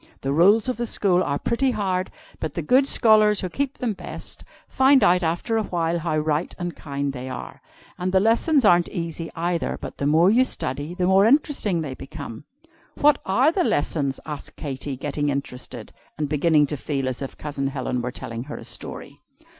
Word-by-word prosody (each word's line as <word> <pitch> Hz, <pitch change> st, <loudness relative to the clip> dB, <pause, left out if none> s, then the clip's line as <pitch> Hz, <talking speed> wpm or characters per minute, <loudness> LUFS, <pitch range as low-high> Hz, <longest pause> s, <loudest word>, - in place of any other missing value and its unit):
The 135 Hz, +1 st, -1 dB
rules 200 Hz, -, +5 dB
of 255 Hz, -, -1 dB
the 240 Hz, 0 st, -2 dB
school 185 Hz, -4 st, +2 dB
are 140 Hz, -5 st, 0 dB
pretty 250 Hz, -, 0 dB
hard, 190 Hz, -5 st, -1 dB, 0.3 s
but 155 Hz, -2 st, -4 dB
the 170 Hz, -, -3 dB
good 260 Hz, -, +4 dB
scholars, 215 Hz, -4 st, +4 dB
who 185 Hz, -, -3 dB
keep 275 Hz, +7 st, -2 dB
them 235 Hz, -4 st, -1 dB
best, -, -, -8 dB, 0.2 s
find 265 Hz, 0 st, +4 dB
out 180 Hz, +1 st, +4 dB
after 175 Hz, +7 st, -1 dB
a 220 Hz, -, +1 dB
while 170 Hz, -3 st, -1 dB
how 160 Hz, -2 st, -1 dB
right 155 Hz, +2 st, -1 dB
and 175 Hz, -1 st, -4 dB
kind 140 Hz, -1 st, -3 dB
they 130 Hz, 0 st, -6 dB
are. 130 Hz, -, -8 dB, 0.4 s
And 180 Hz, +1 st, -1 dB
the 190 Hz, -, +4 dB
lessons 235 Hz, -, +3 dB
aren't 175 Hz, -3 st, +5 dB
easy, 165 Hz, -2 st, -4 dB
either, 170 Hz, 0 st, -1 dB
but -, -, -8 dB
the 140 Hz, -, 0 dB
more 165 Hz, +6 st, +5 dB
you 245 Hz, +4 st, +5 dB
study 145 Hz, -, -3 dB
the 180 Hz, -1 st, 0 dB
more 190 Hz, +3 st, +5 dB
interesting 245 Hz, -, +2 dB
they 140 Hz, -4 st, -4 dB
become." 135 Hz, -3 st, -9 dB, 0.5 s
"What 295 Hz, 0 st, +4 dB
are 250 Hz, +11 st, +4 dB
the 365 Hz, +1 st, +1 dB
lessons?" 145 Hz, -, 0 dB
asked 150 Hz, -2 st, -7 dB
Katy, 135 Hz, -2 st, -5 dB
getting 145 Hz, +2 st, -2 dB
interested, 135 Hz, -2 st, -5 dB, 0.2 s
and 150 Hz, -1 st, -1 dB
beginning 150 Hz, +1 st, +3 dB
to -, -, -2 dB
feel 135 Hz, -1 st, -2 dB
as 130 Hz, 0 st, -3 dB
if 135 Hz, -, -6 dB
Cousin 145 Hz, -2 st, -3 dB
Helen 130 Hz, -2 st, -2 dB
were 125 Hz, -, -3 dB
telling 115 Hz, 0 st, -6 dB
her 145 Hz, -, -7 dB
a -, -, -10 dB
story. -, -, -7 dB
170 Hz, 195 wpm, -23 LUFS, 145-210 Hz, 0.5 s, rules